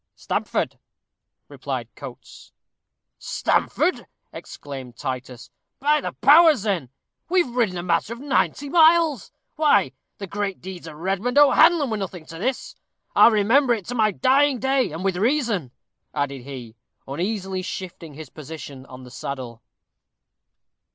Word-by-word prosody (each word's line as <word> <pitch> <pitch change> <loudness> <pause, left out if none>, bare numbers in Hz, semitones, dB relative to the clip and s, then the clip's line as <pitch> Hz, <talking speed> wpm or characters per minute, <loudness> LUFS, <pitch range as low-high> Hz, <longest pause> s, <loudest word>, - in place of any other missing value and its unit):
"Stamford," - - -2 0.7
replied - - -5
Coates. - - -12 0.7
"Stamford!" 365 - 0 0.3
exclaimed 130 -4 -9
Titus; 125 -1 -6 0.3
"by 295 +2 +2
the - - -4
powers! 300 - +6
then 185 - -1 0.4
we've 360 -3 +3
ridden 215 -8 +1
a 175 - -4
matter 175 +5 0
of 235 - -11
ninety 285 +1 0
miles. 320 - +4 0.3
Why, 305 -1 +3 0.3
the 200 - -6
great 200 0 -3
deeds 185 -2 -9
of 155 - -9
Redmond 195 - -2
O'Hanlon 290 0 +5
were 220 - -1
nothing 185 -4 -6
to 165 +1 -10
this! 255 +6 -3 0.4
I'll - - +8
remember 235 +4 +3
it 205 -5 -8
to - - -3
my 220 -3 +3
dying 270 +6 +3
day, 265 - +1
and 160 +4 -6
with 190 -2 0
reason," 225 - 0 0.5
added 140 -2 -2
he, 125 -5 -9 0.3
uneasily 190 +5 -3
shifting 175 -4 -7
his 155 -3 -10
position 145 -3 -9
on 130 0 -11
the 125 - -13
saddle. 125 -5 -6
195 Hz, 135 wpm, -23 LUFS, -, 0.7 s, I'll